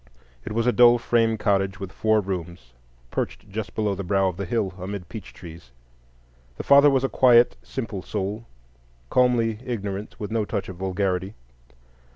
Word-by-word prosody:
It - - -6
was 115 +1 0
a 125 - +4
dull 120 0 +6
frame 115 -1 +1
cottage 95 -2 0
with 95 -1 -6
four 110 +2 +2
rooms, 85 -9 -6 0.4
perched - - -4
just 110 +1 -5
below 105 -2 0
the 100 +1 -5
brow 95 +1 +1
of 90 - -7
the 100 - -3
hill, 100 -3 -1
amid 95 -1 -6
peach 110 -5 -8
trees. 85 -6 -12 0.9
The - - -5
father 140 +1 +7
was 135 -2 +1
a - - +2
quiet, 125 -2 +5
simple 110 -7 -5
soul, 105 +4 -4 0.6
calmly 115 -3 +2
ignorant, 105 -4 -5
with 105 0 -5
no 115 -1 0
touch 100 -2 -4
of 95 - -8
vulgarity. 95 +1 -2
105 Hz, 170 wpm, -24 LUFS, 95-115 Hz, 0.9 s, father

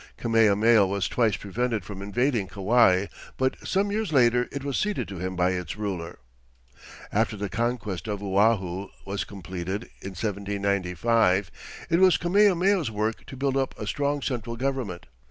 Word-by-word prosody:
Kamehameha 110 -1 +4
was 100 0 -1
twice 110 -5 +1
prevented 110 0 -2
from 100 0 -7
invading 110 +1 0
Kauai, 100 -1 +3 0.3
but 130 0 +1
some 200 +1 0
years 215 -4 -1
later 125 -3 +3
it 140 -1 -5
was 140 -2 -2
ceded 210 -1 -1
to 95 -3 -7
him 95 +1 -3
by 90 +1 +2
its 90 0 -4
ruler. 95 -5 -4 0.9
After 110 0 0
the 100 0 -3
conquest 115 -5 -2
of 105 -1 -3
Oahu 100 -2 +1 0.2
was 100 +1 -2
completed, 95 +1 -5 0.2
in 95 - -7
1795, 100 0 0 0.4
it 165 - +4
was 185 -3 +6
Kamehameha's 185 - +3
work 110 +1 -3
to 135 - -9
build 135 0 0
up 135 -1 -1
a 105 - -4
strong 140 +5 -1
central 120 -3 -3
government. 125 -8 -3
110 Hz, 155 wpm, -26 LUFS, 95-130 Hz, 0.9 s, was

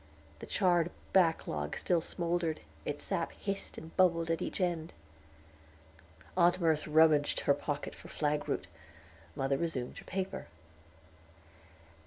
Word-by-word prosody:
The - - -8
charred 175 -4 +3 0.2
backlog 160 - +2
still 175 -2 +2
smoldered, 170 -1 -1 0.2
its - - -3
sap - - -1
hissed 195 -1 -5
and 160 +1 -10
bubbled 170 -3 +4
at 165 - 0
each - - -3
end. 170 -3 -1 1.4
Aunt 175 0 +4
Merce 160 -3 +2
rummaged 155 -1 +4
her 140 - +4
pocket 145 0 -3
for - - -12
flagroot; 150 -1 -1 0.7
mother 135 0 +1
resumed 140 -7 -3
her - - -13
paper. 190 0 -3
165 Hz, 120 wpm, -32 LUFS, 150-175 Hz, 1.4 s, bubbled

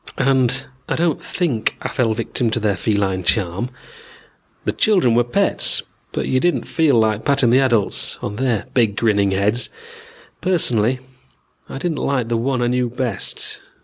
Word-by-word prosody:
"And 135 -1 +2 0.2
don't 165 -2 0
think 145 -12 -1
I - - -1
fell 115 -3 0
victim 115 +2 -1
to 110 - -1
their 105 -2 +1
feline 95 -2 0
charm. 95 +4 0 1.0
The - - +1
children 185 - +3
were 120 +1 +4
pets, 120 0 +1 0.3
but - - -2
you 130 - +2
didn't 175 +5 +1
feel 155 -6 +2
like 110 -1 +1
patting 140 -4 +3
the 130 - +5
adults 120 -7 +2
on 105 - -5
their 125 -5 0
big 115 -5 +2
grinning 105 -3 +2
heads. 100 +5 0 0.7
Personally 130 - +2 0.7
I - - -6
didn't 160 +1 -2
like 130 -4 -1
the 115 - +1
one 125 +1 0
I - - +1
knew 125 0 0
best. 120 -4 -2
120 Hz, 155 wpm, -20 LUFS, 110-135 Hz, 1.0 s, the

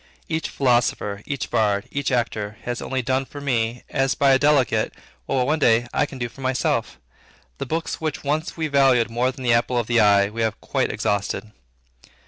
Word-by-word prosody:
Each 160 0 -2
philosopher, 120 -6 +1
each 140 -5 -4
bard, 105 0 +1
each 140 -1 -2
actor, 110 -4 -1
has 120 0 -4
only 130 -1 -2
done 130 +2 0
for 145 +2 -10
me, 120 -4 -1
as 135 -1 0
by 140 -1 +4
a 130 - +5
delegate, 135 -7 +2 0.3
what 130 -2 +1
one 155 +4 +1
day 120 -3 +4
I 145 - +1
can 135 - -9
do 120 -1 -2
for 135 - -14
myself. 130 0 -1 0.6
The 140 - -4
books 160 +4 -3
which 155 -2 -3
once 155 +4 -2
we 160 - -1
valued 135 -5 +3
more 125 +2 +1
than 130 0 -10
the 120 -2 +3
apple 120 +1 +1
of 120 - +1
the 120 +1 +2
eye, 100 -2 +5
we 115 +1 -4
have 110 -1 -1
quite - - -1
exhausted. 100 +2 -2
125 Hz, 195 wpm, -23 LUFS, 115-140 Hz, 0.6 s, a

